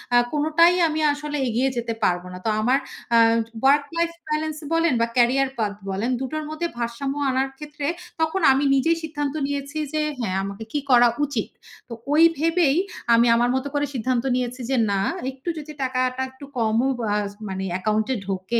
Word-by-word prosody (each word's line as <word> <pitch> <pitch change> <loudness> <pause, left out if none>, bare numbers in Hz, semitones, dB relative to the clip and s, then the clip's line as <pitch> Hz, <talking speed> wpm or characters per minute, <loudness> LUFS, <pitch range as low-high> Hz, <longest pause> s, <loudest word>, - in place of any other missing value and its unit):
আ - - +8 0.2
কোনোটাই 315 +3 +4
আমি 315 0 -2
আসলে 295 0 -4
এগিয়ে 245 +3 +1
যেতে 235 -1 -2
পারবো 180 0 +1
না। 180 - -7
তো - - +2
আমার 250 +5 +3 0.4
আ - - +7 0.4
ওয়ার্ক 280 +2 +5
লাইফ 335 0 +1 0.2
বেলেন্স 305 0 -1 0.2
বলেন 330 -3 +3
বা 230 - +2
ক্যারিয়ার 260 +3 +3
পাথ 205 -2 0 0.2
বলেন, 200 +6 -1
দুটোর 310 +4 -3
মধ্যে 315 +2 -2
ভারসাম্য 240 +4 -3 0.2
আনার 265 +1 0
ক্ষেত্রে 295 -1 -7 0.4
তখন 320 +4 0
আমি 270 +2 +2
নিজেই 325 +5 +2
সিদ্ধান্ত 290 -3 -3
নিয়েছি 285 +1 -4 0.2
যে 310 - +1 0.2
হ্যা, 230 - -2
আমাকে 200 +2 -6
কি 295 - 0
করা 240 0 +7 0.2
উচিত। 265 -7 -3 0.4
তো - - -6 0.2
ঐ - - +3 0.2
ভেবেই 325 -1 +2 0.4
আমি 235 +1 +5
আমার 240 +1 +2
মত 265 - -1
করে 290 0 +1
সিদ্ধান্ত 250 -1 0
নিয়েছি 250 0 -3
যে 270 - +2 0.2
না 195 - +1 0.3
একটু 270 +6 -7
যদি 305 0 -7
টাকাটা 255 0 -1
একটু 260 +2 -12
কমও 225 +3 +2
বাজ 210 -2 0 0.2
মানে 190 0 -4
অ্যাকাউন্ট 215 +3 0
এ - - -1
ঢোকে 195 +4 -1
265 Hz, 180 wpm, -23 LUFS, 235-295 Hz, 0.4 s, আ